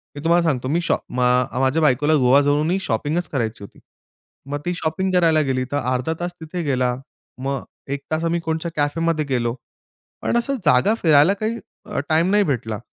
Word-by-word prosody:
मी 145 - -7
तुम्हाला 170 +1 +3
सांगतो, 130 -3 -2
मी 165 +6 +1
शॉ - - +1
अ, 125 +1 0
माझ्या 135 +4 +2
बायकोला 145 +1 +3
गोवा 130 +1 +5
जाऊनही 150 +6 +1
शॉपिंगच 150 +7 -1
करायची 115 -6 -3
होती. 100 - -13 0.7
मग 145 0 -2
ती 175 - 0
शॉपिंग 175 +4 -1
करायला 165 -3 +4
गेली 130 -3 0
तर 145 - 0
अर्धा 130 +3 -1
तास 175 0 -3
तिथे 165 +2 -5
गेला, 125 -4 0 0.5
मग 135 -1 -2 0.3
1 140 - -3
तास 160 +1 0
आम्ही 170 +1 0
कोणत्या 160 +1 -3
कॅफेमध्ये 155 +1 0
गेलो. 120 -4 -1 0.7
पण 235 - 0
असं 275 +4 0
जागा 150 +8 +4
फिरायला 155 +2 +5
काही 225 +2 -2 0.3
अ, - - -3
टाईम 165 +4 +3
नाही 205 0 +4
भेटला. 115 - -2
150 Hz, 180 wpm, -21 LUFS, 130-170 Hz, 0.7 s, गोवा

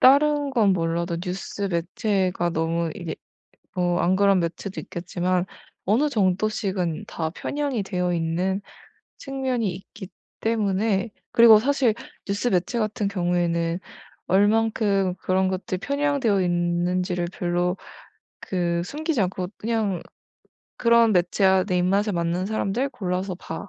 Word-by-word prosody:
다른 290 +2 +5
건 220 -7 +3
몰라도 170 0 -1
뉴스 185 +3 -5
매체가 185 0 0
너무 165 0 -1
이게 170 -5 -5 0.6
뭐 175 -1 +1
안 185 +2 +3
그런 200 -1 +4
매체도 175 +3 -4
있겠지만 180 +1 -2 0.4
어느 230 +10 +3
정도씩은 195 - 0
다 160 -1 -3
편향이 280 -1 -2
되어 180 -2 -1
있는 175 +4 0 0.6
측면이 260 -5 -2
있기 190 +1 -10 0.3
때문에 215 -1 +1 0.2
그리고 230 -2 +8
사실 260 -2 +2 0.3
뉴스 200 +4 -1
매체 190 +3 +1
같은 215 -2 -1
경우에는 175 -2 0 0.5
얼마큼 205 -1 +2
그런 190 +1 +1
것들이 185 0 -3
편향되어 280 -4 +1
있는지를 175 +1 0
별로 175 0 0 0.6
그 170 -2 -1
숨기지 305 - -2
않고 185 -1 -1
그냥 220 -5 -1 0.8
그런 235 -2 +4
매체와 190 +1 +3
"내 185 -3 0
입맛에 195 +4 +2
맞는 170 +1 -1
사람들 220 +5 -1
골라서 185 -4 -3
봐." 180 +3 -7
190 Hz, 270 characters per minute, -24 LUFS, 175-220 Hz, 0.8 s, 그리고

